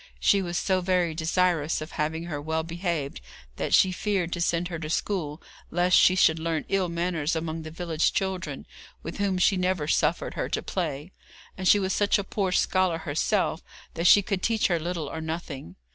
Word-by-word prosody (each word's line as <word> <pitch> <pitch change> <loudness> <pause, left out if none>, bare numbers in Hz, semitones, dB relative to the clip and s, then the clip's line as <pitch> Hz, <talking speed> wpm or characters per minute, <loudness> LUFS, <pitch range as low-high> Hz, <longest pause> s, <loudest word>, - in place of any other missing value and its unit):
She 200 - +4
was 175 -1 -3
so 190 -1 +1
very 180 -2 +1
desirous 165 -1 +1
of 155 +2 -7
having 160 +2 -2
her 155 -4 -5
well 160 +1 -1
behaved 165 - -3 0.4
that - - -2
she 190 - +5
feared 185 -2 -1
to 175 - -3
send 170 +1 0
her 170 -2 -5
to 155 -1 -5
school, 160 -3 -2 0.3
lest 180 +1 +3
she 185 - +6
should 160 -3 +4
learn 160 -1 -2
ill 190 -2 +1
manners 170 -2 -1
among 160 0 -3
the 155 - -7
village 165 -1 0
children, 185 -7 -3 0.4
with 165 - -6
whom 195 -2 +1
she 190 +1 +3
never 180 -4 0
suffered - - +1
her - - -3
to - - -2
play, 160 -2 -3 0.4
and 190 -1 -3
she 205 - +7
was 190 -1 0
such 205 +1 +3
a 200 - -2
poor 195 -1 -2
scholar 185 -2 +2
herself 165 +3 0 0.3
that 170 +2 +1
she 205 +2 +7
could 190 -1 -2
teach 225 -1 +1
her 170 -2 +1
little 170 -2 -3
or 160 +3 -5
nothing. 160 - -6
170 Hz, 195 wpm, -26 LUFS, 160-185 Hz, 0.4 s, she